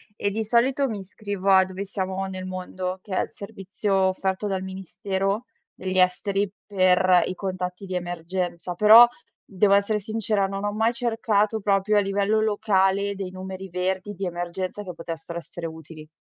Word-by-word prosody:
e, 200 - -1
di 220 +2 -2
solito, 255 +5 +2
mi 215 -4 -4
iscrivo 200 0 -4
a 190 -1 +7
Dove 185 +1 -6
siamo 190 -1 -3
nel 185 -1 -6
mondo, 185 0 -4
che 195 -2 -5
è - - +3
il - - -8
servizio 195 0 -4
offerto 190 +1 0
dal 195 -2 -1
Ministero 190 +3 -3 0.3
degli 185 0 -4
Esteri 195 +2 +2 0.2
per 185 -2 +4
i - - -3
contatti 185 0 -4
di 185 - -4
emergenza. 175 0 -3
Però, 220 +5 +9 0.4
devo 200 +1 +2
essere 200 +2 +3
sincera, 215 -1 -1
non 195 +1 -4
ho 205 - 0
mai 220 +3 +1
cercato 225 -3 0
proprio 200 +1 +2
a - - +7
livello 200 +2 +1
locale 200 -2 +1
dei 190 -2 -5
numeri 190 +1 -7
verdi 185 +3 -2
di 195 0 -7
emergenza 175 +3 -4
che 180 -3 -7
potessero 165 0 -6
essere 170 +1 -8
utili. 160 -1 -9
190 Hz, 165 wpm, -25 LUFS, 185-205 Hz, 0.4 s, Però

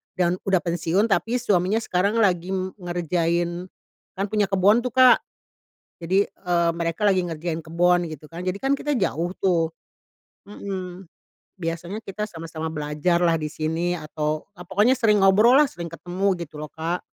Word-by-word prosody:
dan 180 -1 +1
udah 190 -2 +4
pensiun 170 +3 0
tapi 220 +6 +1
suaminya 200 0 +2
sekarang 195 +5 0
lagi 185 -3 +1 0.3
ngerjain, 175 0 -1 0.5
kan 195 - 0
punya 210 -2 +2
kebon 200 +4 +4
tuh - - -5
Kak. 255 -1 +7 0.8
Jadi, 190 +4 +3
eee, 170 -2 0
mereka 170 +4 -3
lagi 185 -2 +3
ngerjain 165 0 -4
kebon 175 +1 +2
gitu 150 +1 -14
kan, 170 +2 -7
jadi 185 +2 -1
kan, 270 +1 +2
kita 295 0 -1
jauh 175 -2 -1
tuh 170 -4 +1 0.8
mhm, 185 -3 -6 0.5
biasanya 170 +5 -4
kita 210 0 -5
sama-sama 160 -2 -6
belajar 150 +3 0
lah 170 -1 +3
di 155 - -3
sini, 160 +3 -1
atau 155 -1 -3
ah 180 - -10
pokoknya 210 +7 +3
sering 215 -4 +3
ngobrol 215 +6 +6
lah, 300 - +5
sering 170 -6 -7
ketemu, 180 +4 -1
gitu 155 -3 -8
loh 155 - -7
Kak. 165 +3 -3
175 Hz, 155 wpm, -24 LUFS, 165-195 Hz, 0.8 s, Kak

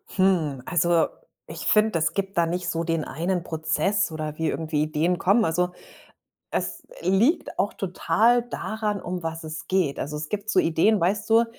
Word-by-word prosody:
Hm, 170 -9 +2
also, 175 -1 +2 0.4
ich - - -7
finde, 215 -5 +3
es 160 - +1
gibt 195 -2 -3
da 170 - +4
nicht 175 +2 -2
so 165 0 -1
den 165 -2 -1
einen 170 +6 -2
Prozess 160 +5 0
oder 155 -1 -5
wie 160 -1 0
irgendwie 155 0 -1
Ideen 155 +4 0
kommen. 200 +6 +3
Also, 180 +2 +1 0.8
es - - -3 0.2
liegt 225 - +2
auch 200 +2 +1
total 225 +5 +2
daran, 215 -3 -3
um 180 0 -4
was 165 0 -4
es 155 0 -7
geht. 185 -7 +1
Also, 150 +2 -4
es 150 0 -5
gibt 210 0 -4
so 195 - +4
Ideen, 185 +6 +3
weißt 200 +5 0
du, 225 +1 +5
175 Hz, 175 wpm, -25 LUFS, 160-200 Hz, 0.8 s, du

